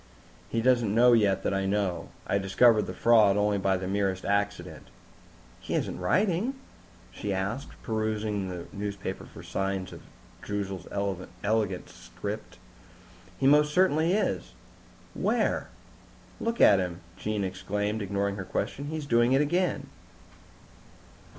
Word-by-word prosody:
"He 115 -1 -1
doesn't 120 -5 +3
know 120 +1 +6
yet 100 -4 +3
that - - 0
I 95 0 0
know. 95 -4 -1 0.2
I 100 - +1
discovered 105 +3 +4
the - - -5
fraud 110 -4 +5
only 105 -1 +2
by 95 0 +2
the 95 0 -4
merest 95 -1 -1
accident." 100 0 -2 0.7
"He - - -4
isn't - - -2
writing?" 190 - +1 0.6
she 100 +10 -4
asked, 100 +8 -3
perusing 110 -3 -1
the 90 -2 -6
newspapers 100 -1 -5
for - - -11
signs 95 -1 -3
of - - -10 0.4
Droozle's 100 -3 -4 0.6
elegant 105 -3 0
script. - - -7 0.8
"He 135 - -1
most 150 +2 +5
certainly 175 -2 +3
is." 215 - -1 0.6
"Where?" - - 0 0.7
"Look 230 +1 -2
at 100 -2 +7
him!" 90 -1 -3
Jean 105 -1 -2
exclaimed, 105 +3 -2
ignoring 100 0 -1
her 95 - -4
question. 135 +8 -3
"He's 155 0 -4
doing 120 -1 +3
it 135 - +4
again!" 175 +5 0
105 Hz, 130 wpm, -28 LUFS, 95-120 Hz, 0.8 s, at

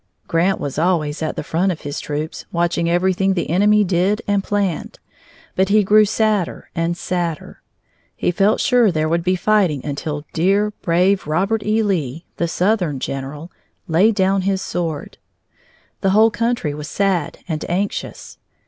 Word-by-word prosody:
Grant 180 +3 +1
was 145 +1 -4
always 165 -3 0
at 155 - -2
the - - -4
front 180 +6 0
of 165 - -6
his 145 0 -5
troops, 150 +2 -5
watching 170 0 0
everything 190 +2 +1
the 175 - -2
enemy 210 +4 +4
did 190 +3 +1
and 200 -1 +1
planned, 200 -5 -2 0.6
but 190 +1 +2
he 210 +1 +4
grew 215 +2 +5
sadder 215 -3 -1
and 170 0 -1
sadder. 175 -4 -4 0.5
He - - 0
felt 195 +4 +2
sure 245 -6 +3
there 155 -2 0
would 170 +1 0
be 185 +1 +2
fighting 185 -8 +1
until 145 +1 -4
dear, 200 +5 +2
brave 185 +2 +2
Robert 195 +8 0
E. 215 +1 +1
Lee, 165 -7 -2
the 170 - 0
southern 180 -5 0
general, 140 +6 -5 0.4
laid 190 +7 +3
down 195 0 +2
his 190 0 0
sword. 165 -4 -4 0.8
The 195 - +1
whole 220 +3 +5
country 230 -11 -1
was 150 0 -7
sad 190 -6 0
and 160 -3 -3
anxious. 195 +4 -3
180 Hz, 155 wpm, -20 LUFS, 160-200 Hz, 0.8 s, grew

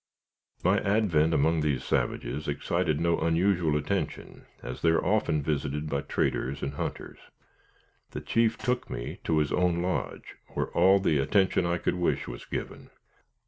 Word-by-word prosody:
My 95 +3 +3
advent 95 -7 +2
among 80 +1 +2
these 75 -4 0
savages 70 +5 -2
excited 75 +2 0
no 85 0 +1
unusual 85 -2 +2
attention, 75 - -4 0.2
as 60 - -6
they 85 - +4
are 80 - +2
often 85 -8 +1
visited 75 0 -2
by 70 0 0
traders 70 +2 -1
and 70 - -2
hunters. - - -5 0.9
The - - -6
chief 115 0 +1
took 125 0 -2
me - - -5
to 80 - +1
his 75 -2 +1
own 90 -1 +1
lodge, 90 +1 -4 0.2
where - - -1
all 95 +3 +5
the 80 -6 +2
attention 95 +3 +2
I 85 0 +1
could - - -1
wish 90 -1 -1
was - - -8
given. - - -6
80 Hz, 155 wpm, -28 LUFS, 75-90 Hz, 0.9 s, all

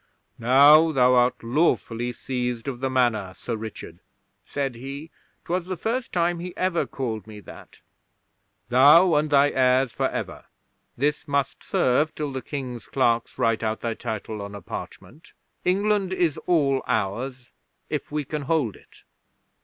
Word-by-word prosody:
'"Now 145 +7 +6
thou 125 -3 +4
art 125 -1 +2
lawfully 120 -3 0
seized 125 -1 -4
of 130 -3 -4
the 135 +1 -1
Manor, 115 -7 0
Sir 120 - -4
Richard," 110 -6 -8 0.4
said 140 -2 -3
he 140 +6 -8 0.3
'twas 180 +1 -2
the 185 -1 -4
first 235 +7 -2
time 175 0 0
he 180 +1 -7
ever 185 -2 0
called 115 -5 -4
me 105 -1 -10
that - - -14 0.9
"thou 150 +8 +7
and 150 0 +2
thy 145 0 +4
heirs 130 -1 +2
for - - 0
ever. - - -6 0.5
This 145 +4 -1
must 140 -2 -1
serve 145 +5 +1
till 150 -2 -3
the 130 -1 -4
King's 125 -6 -6
clerks 120 -3 0
write 115 -1 +1
out 110 -1 -2
thy 115 -1 -2
title 110 -1 -5
on 100 0 -7
a 100 - -8
parchment. 95 - -9 0.3
England 195 0 +1
is 175 -5 0
all 140 -6 +2
ours 125 +3 -2 0.4
if 150 -1 -4
we 150 0 -1
can 150 +2 -4
hold 140 -7 0
it." - - -20
135 Hz, 155 wpm, -24 LUFS, 120-155 Hz, 0.9 s, thou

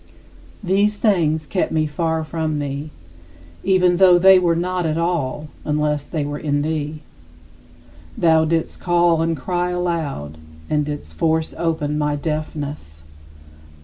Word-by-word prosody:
These 200 +3 +2
things 160 -8 +1
kept 185 - -1
me 155 -1 +1
far 160 +1 -1
from 155 -1 -2
thee; 145 +1 -4 0.7
even 180 -2 +3
though 185 -1 +7
they 190 +1 +7
were 170 -2 +2
not 180 +1 -1
at 160 -1 -1
all 155 -4 -1
unless 150 -1 -1
they 155 -4 -2
were 145 0 -4
in 145 -1 0
thee. 155 -1 -3 1.1
Thou 160 -1 +4
didst 165 0 -1
call 175 -2 +2
and 165 -1 0
cry 175 +6 -1
aloud, 160 - -3 0.3
and 150 -1 +2
didst 145 - -6
force 160 - 0
open 150 -3 -1
my 150 0 0
deafness. 145 - -5
160 Hz, 135 wpm, -20 LUFS, 150-175 Hz, 1.1 s, though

